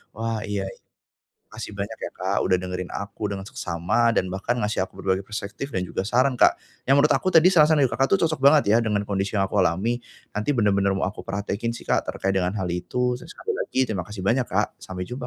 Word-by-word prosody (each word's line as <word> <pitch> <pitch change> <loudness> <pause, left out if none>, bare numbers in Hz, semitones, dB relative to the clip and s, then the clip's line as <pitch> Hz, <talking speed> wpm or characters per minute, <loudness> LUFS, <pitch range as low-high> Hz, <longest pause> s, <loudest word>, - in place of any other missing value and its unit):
Wah, 115 0 -2
iya 100 -1 -2
iya. - - -16 0.7
Makasih 105 - -7
banyak 100 +3 -5
ya, - - -5
Kak, 95 +2 -2
udah 90 - +4
dengerin 90 0 -4
aku 100 +1 -4
dengan 100 -1 -4
seksama 100 +6 0
dan 90 -3 0
bahkan 100 +6 -1
ngasih 105 -3 0
aku - - -28
berbagai 95 0 0
perspektif 105 +6 -6
dan 90 - 0
juga 95 +2 -3
saran, 125 +2 +2
Kak, - - +6 0.3
yang 135 - +5
menurut 145 +2 +4
aku - - +1
tadi 165 +3 +7
saran-saran 155 -4 +5
dari 130 - +3
Kakak 135 - +2
itu 195 - +1
cocok 160 -1 +1
banget 140 -4 +5
ya 110 - +6
dengan 105 -3 0
kondisi 100 0 -2
yang 95 -1 +1
aku 105 - 0
alami. 95 +7 +1 0.3
Nanti, 105 +8 -1
benar-benar 100 -3 +2
mau 95 - -2
aku - - -11
praktekkin 100 +4 -2
sih, - - -9
Kak, - - 0
terkait 95 0 -1
dengan 90 +2 0
hal 95 -4 -2
itu, 125 +8 -1
terus 165 +6 -12
sekali 450 - -5
lagi 130 - 0
terima 95 -8 -2
kasih 105 -2 -7
banyak, 120 +5 +2
Kak, - - -1
sampai 95 -1 -6
jumpa! 125 +6 -6
105 Hz, 230 wpm, -24 LUFS, 95-125 Hz, 0.7 s, tadi